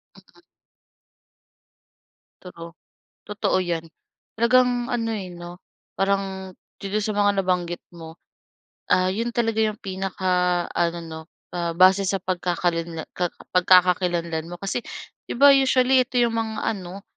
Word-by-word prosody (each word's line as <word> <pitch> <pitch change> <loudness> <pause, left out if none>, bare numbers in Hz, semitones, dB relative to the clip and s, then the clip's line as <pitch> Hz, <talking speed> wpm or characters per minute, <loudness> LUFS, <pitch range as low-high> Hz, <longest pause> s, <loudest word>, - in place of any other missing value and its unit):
Mm. - - -21 2.0
True. 170 -2 -11 0.5
Totoo 205 -2 -1
'yan, 170 -2 -3 0.5
talagang 245 +1 +2
ano 230 -2 -1
eh, 190 -4 -5
'no, 175 +1 -10 0.3
parang 195 -1 -1 0.3
dito 200 +2 -1
sa 215 0 -2
mga 205 -1 +2
nabanggit 180 -2 -1 0.2
mo. 165 -1 -11 0.7
Ah, 185 0 +4
'yon 230 +5 -2
talaga 225 -2 0
'yong 215 -1 -1
pinakaano 180 -2 -1
'no, 160 -1 -8 0.3
ah, 170 -1 -1
base 185 +2 +6
sa 195 +1 0
pagkakalinla 175 -2 -2
ka 175 -1 -1 0.2
pagkakakilanlan 175 -2 +3
mo 175 - -6
kasi, 195 +6 -3 0.5
'di - - -2
ba, 280 +1 +8
usually 260 -1 +4
ito 250 -2 -2
'yong 235 -1 +2
mga 225 -1 -2 0.2
ano, 190 +1 -9
185 Hz, 120 wpm, -23 LUFS, 175-215 Hz, 2.0 s, ba